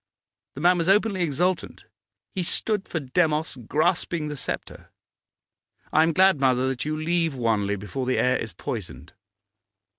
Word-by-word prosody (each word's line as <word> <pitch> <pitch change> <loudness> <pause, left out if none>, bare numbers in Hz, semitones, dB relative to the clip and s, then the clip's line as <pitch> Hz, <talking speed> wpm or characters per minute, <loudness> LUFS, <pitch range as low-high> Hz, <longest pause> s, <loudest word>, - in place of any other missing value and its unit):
The 140 - -6
man 175 +1 +4
was 165 +2 0
openly 200 -1 +3
exultant; 175 +3 -1 0.5
he 190 - -2
stood 200 +3 0
for 165 - -2
Demos 155 +1 0
grasping 155 - -1
the 150 - -4
sceptre. 135 - -6 1.0
I 155 - +5
am 165 +1 +3
glad, 190 -1 +4
mother, 130 -1 +3
that 125 -1 -3
you 155 0 -2
leave 165 -1 0
Wanley 110 -5 0
before 105 +6 -5
the 130 - +1
air 125 0 +2
is 110 - -5
poisoned. 85 - -7
155 Hz, 150 wpm, -25 LUFS, 130-175 Hz, 1.0 s, I